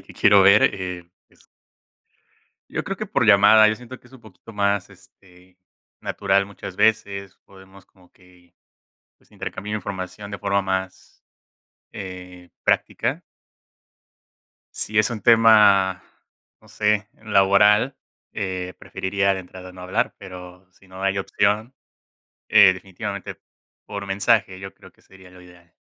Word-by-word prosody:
que - - -16
quiero 100 -1 +5
ver, 100 +3 +6
eh, 90 -2 -7 0.2
pues - - -27 1.2
Yo - - -4
creo - - -4
que - - -5
por - - 0
llamada, 105 +2 +7
yo 110 - 0
siento 125 +2 -12
que - - -23
es 125 - -22
un 130 - -15
poquito 110 0 -16
más, 100 -2 -1
este, 90 -1 -21 0.4
natural 100 0 0
muchas 100 -2 -10
veces, 100 -3 0
podemos 95 0 -18
como 90 -2 -26
que, 90 -2 -24 0.6
pues, - - -31
intercambiar 105 +1 -6
información 100 +1 -7
de 100 - -5
forma 100 +1 0
más, 95 -1 -5 0.7
eh, 90 -2 -10
práctica. - - -1 1.5
Si 105 - -4
es 110 -2 +3
un 115 -3 -5
tema, 105 -4 +5 0.6
no 110 - -22
sé, 105 -1 0 0.2
laboral, 105 +5 +3 0.4
eh, 90 -1 -4
preferiría 100 +1 -1
de 95 - -5
entrada 90 0 -12
no 90 - -13
hablar, 90 +1 -2
pero 90 -1 -12
si 95 +1 -24
no 95 +1 -11
hay 95 0 0
opción, 105 +5 -1 0.7
eh, 95 - +6
definitivamente 100 +2 -7 0.5
por 100 -1 -7
mensaje 100 0 +1
yo 95 0 -9
creo - - -18
que - - -30
sería 95 -1 -18
lo 90 0 -16
ideal. 85 -1 -20
95 Hz, 140 wpm, -22 LUFS, 95-105 Hz, 1.5 s, llamada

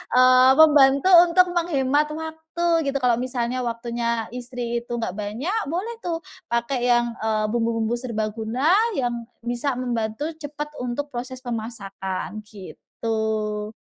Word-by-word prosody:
eee, 255 +1 +7
membantu 290 +2 +6 0.2
untuk 360 +1 +4
menghemat 300 -4 +1
waktu 320 0 -1
gitu 275 - -1
kalau 240 -2 +3
misalnya 250 -1 -2
waktunya 235 0 -2
istri 245 -1 -4
itu 240 0 -6
enggak 230 -6 -2
banyak, 245 - -2
boleh 365 +10 -2
tuh 335 -3 -4 0.2
pakai 240 +1 -1
yang, 240 -1 +4
eee, 215 -1 0
bumbu-bumbu 230 0 0
serbaguna 225 +4 -1 0.2
yang 240 -3 -2 0.2
bisa 240 +3 -1
membantu 245 +3 -2
cepat 295 0 -6
untuk 250 +4 -3
proses 255 +1 -6
pemasakan 210 -5 -5
gitu. 215 +1 -4
245 Hz, 120 wpm, -23 LUFS, 230-285 Hz, 0.2 s, eee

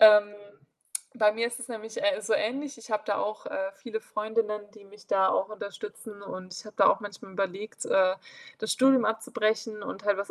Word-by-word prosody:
ähm. 210 -1 +9 0.8
Bei 215 -3 +5
mir 230 +2 0
ist 235 +1 -5
es 250 - -7
nämlich, 225 0 -6
äh, 300 -6 +3
so 215 +2 0
ähnlich, 275 +4 0
ich 225 - -12
habe 215 - +1
da 205 - 0
auch, 215 +1 -2
äh, 190 0 -2
viele 220 +3 -5
Freundinnen, 215 -1 -1
die 210 -2 -16
mich 205 +1 -16
da 190 -1 +4
auch 195 - +1
unterstützen, 215 - -7
und 185 -2 -7
ich - - -7
habe 210 -1 -11
da - - +7
auch - - +4
manchmal 200 -2 -9
überlegt, 195 +2 -3
äh, 185 -1 +4 0.4
das 220 - 0
Studium 260 -3 +6
abzubrechen 215 -1 0
und 200 0 -6
halt 205 - +4
was 200 +1 -3
215 Hz, 205 wpm, -29 LUFS, 200-225 Hz, 0.8 s, ähm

